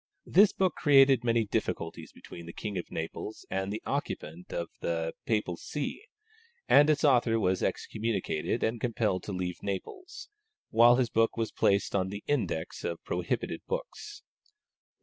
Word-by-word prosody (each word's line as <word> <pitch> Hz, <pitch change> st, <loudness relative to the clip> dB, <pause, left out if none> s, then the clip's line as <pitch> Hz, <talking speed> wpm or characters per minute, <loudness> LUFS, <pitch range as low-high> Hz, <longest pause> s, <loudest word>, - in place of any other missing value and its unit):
This 200 Hz, +3 st, +6 dB
book 185 Hz, -3 st, +1 dB
created 135 Hz, -4 st, +5 dB
many 115 Hz, -1 st, +2 dB
difficulties 85 Hz, -4 st, -3 dB
between 85 Hz, -1 st, -11 dB
the 85 Hz, -, -8 dB
King 105 Hz, -2 st, -5 dB
of 90 Hz, -, -4 dB
Naples 80 Hz, +6 st, -6 dB
and 95 Hz, +1 st, -1 dB
the 105 Hz, -, -5 dB
occupant 85 Hz, +4 st, -4 dB
of 85 Hz, -1 st, -3 dB
the 80 Hz, -1 st, -2 dB
Papal 105 Hz, -6 st, 0 dB
See, 150 Hz, -, -5 dB, 0.6 s
and 145 Hz, +1 st, +6 dB
its 150 Hz, +1 st, +2 dB
author 120 Hz, -5 st, +4 dB
was 95 Hz, -3 st, +1 dB
excommunicated 110 Hz, -3 st, -2 dB
and 115 Hz, +1 st, -1 dB
compelled 110 Hz, -6 st, 0 dB
to -, -, -5 dB
leave 90 Hz, -2 st, -4 dB
Naples, 370 Hz, -, -6 dB, 0.4 s
while 120 Hz, +2 st, +7 dB
his 125 Hz, -2 st, 0 dB
work 115 Hz, +1 st, +2 dB
was 115 Hz, -1 st, -1 dB
placed 100 Hz, 0 st, +1 dB
on 95 Hz, -1 st, +1 dB
the 100 Hz, +1 st, -7 dB
index 145 Hz, -, -2 dB
of -, -, -4 dB
prohibited -, -, -2 dB
books. 475 Hz, -3 st, -6 dB
110 Hz, 150 wpm, -29 LUFS, 95-135 Hz, 0.6 s, while